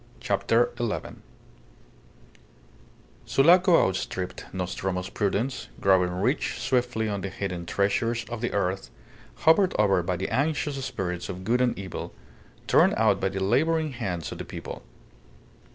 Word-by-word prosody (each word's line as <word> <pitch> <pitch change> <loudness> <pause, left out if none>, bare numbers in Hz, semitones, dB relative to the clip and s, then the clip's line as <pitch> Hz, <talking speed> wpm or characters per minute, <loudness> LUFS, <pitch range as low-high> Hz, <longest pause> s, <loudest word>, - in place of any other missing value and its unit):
CHAPTER 110 +4 +1
ELEVEN 115 -3 -3 2.1
Sulaco 175 - +5
outstripped 95 -1 -4
Nostromo's 90 0 -3
prudence, 105 +6 -1
growing 95 -2 +4
rich 100 - 0
swiftly 120 -3 0
on 100 -2 -2
the 100 - -3
hidden 90 -3 -5
treasures 115 +5 0
of 120 0 -6
the 120 - -1
earth, 95 -1 -1 0.6
hovered 180 +4 +5
over 100 -3 +3
by 90 +1 -1
the 95 +2 -3
anxious 145 -1 -1
spirits 90 -7 -4
of 95 0 -6
good 120 +5 +1
and 125 -1 +1
evil, 95 -3 -6 0.5
torn - - +4
out - - +3
by 95 - 0
the 95 0 -3
labouring 155 +8 +2
hands 90 - -4
of - - -7
the - - -3
people. - - -8
100 Hz, 135 wpm, -26 LUFS, 95-125 Hz, 2.1 s, Sulaco